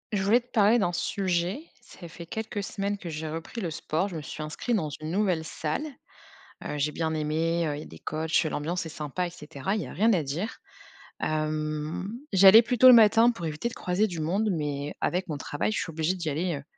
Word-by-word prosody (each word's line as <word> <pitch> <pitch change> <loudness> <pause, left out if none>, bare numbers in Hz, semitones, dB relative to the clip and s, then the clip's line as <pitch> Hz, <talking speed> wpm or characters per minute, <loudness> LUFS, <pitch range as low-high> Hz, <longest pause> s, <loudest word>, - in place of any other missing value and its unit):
Je 195 - +1
voulais 220 +6 +4
te 245 - -29
parler 215 0 +5
d'un 175 -6 +1
sujet. 185 - -1 0.2
Ça 190 -8 -12
fait 170 +1 -10
quelques 220 +1 -4
semaines 200 -1 -3
que 175 - -7
j'ai 155 0 -4
repris 165 +9 -6
le 170 - -3
sport, 160 +5 -2
je 180 - -8
me - - -5
suis 155 +1 -7
inscrite 155 +10 -2
dans 160 -8 -1
une 155 +2 -6
nouvelle 185 -4 +1
salle. 155 - -3 0.8
Heu, 150 - -3
j'ai 150 +2 +1
bien 160 0 -2
aimé, 160 +2 0
heu, 145 - -2
il - - -6
y - - -7
a - - -12
des - - -12
coachs, 160 +2 0
l'ambiance 165 +3 -2
est - - -7
sympa 155 +4 -3
et - - -6
cetera, 160 +1 -4
il 215 - -1
y - - -7
a - - -9
rien 225 +3 +3
à 170 -5 +1
dire. 160 +11 -4 0.6
Hem, 155 +3 -2 0.2
j'allais 195 +3 +9
plutôt 245 +1 +4
le 255 - +11
matin 225 +1 +7
pour 195 -8 -6
éviter 155 +9 -2
de - - -11
croiser 180 +4 0
du 175 -5 -6
monde, 190 +8 0
mais 145 -3 -3
avec 180 +2 0
mon 150 - -2
travail, 145 +7 -2
je - - -2
suis 165 - -4
obligée 160 +3 0
d'y 170 -4 -3
aller, 165 +3 -1
heu, 140 - -9
170 Hz, 235 wpm, -27 LUFS, 155-200 Hz, 0.8 s, le